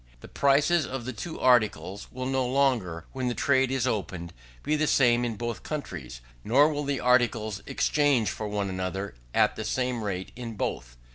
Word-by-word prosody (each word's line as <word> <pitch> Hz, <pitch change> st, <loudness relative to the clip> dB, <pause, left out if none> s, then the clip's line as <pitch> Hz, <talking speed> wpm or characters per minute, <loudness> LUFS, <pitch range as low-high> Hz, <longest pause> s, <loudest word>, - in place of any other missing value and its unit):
The -, -, -10 dB
prices 145 Hz, +4 st, +3 dB
of 130 Hz, -2 st, -5 dB
the 130 Hz, -, -4 dB
two 160 Hz, +9 st, -6 dB
articles 110 Hz, -5 st, +2 dB
will 130 Hz, 0 st, -5 dB
no 130 Hz, 0 st, +1 dB
longer, 125 Hz, -11 st, +1 dB
when 130 Hz, -1 st, -3 dB
the 120 Hz, -, -1 dB
trade 130 Hz, -2 st, +2 dB
is 130 Hz, -2 st, 0 dB
opened, 95 Hz, -8 st, -3 dB, 0.3 s
be 155 Hz, -, +1 dB
the 155 Hz, 0 st, +1 dB
same 120 Hz, -4 st, +4 dB
in 115 Hz, -2 st, -2 dB
both 120 Hz, -3 st, -4 dB
countries, 75 Hz, -, -6 dB, 0.2 s
nor 140 Hz, +7 st, +5 dB
will 145 Hz, 0 st, -3 dB
the 140 Hz, -2 st, -1 dB
articles 115 Hz, -5 st, +2 dB
exchange 140 Hz, -9 st, +2 dB
for 110 Hz, -, -5 dB
one 105 Hz, -1 st, -2 dB
another 95 Hz, 0 st, -3 dB, 0.2 s
at -, -, +3 dB
the 110 Hz, -, -4 dB
same 125 Hz, +1 st, -1 dB
rate 95 Hz, -2 st, -4 dB
in 120 Hz, -2 st, -6 dB
both. -, -, -4 dB
120 Hz, 185 wpm, -27 LUFS, 100-135 Hz, 0.3 s, nor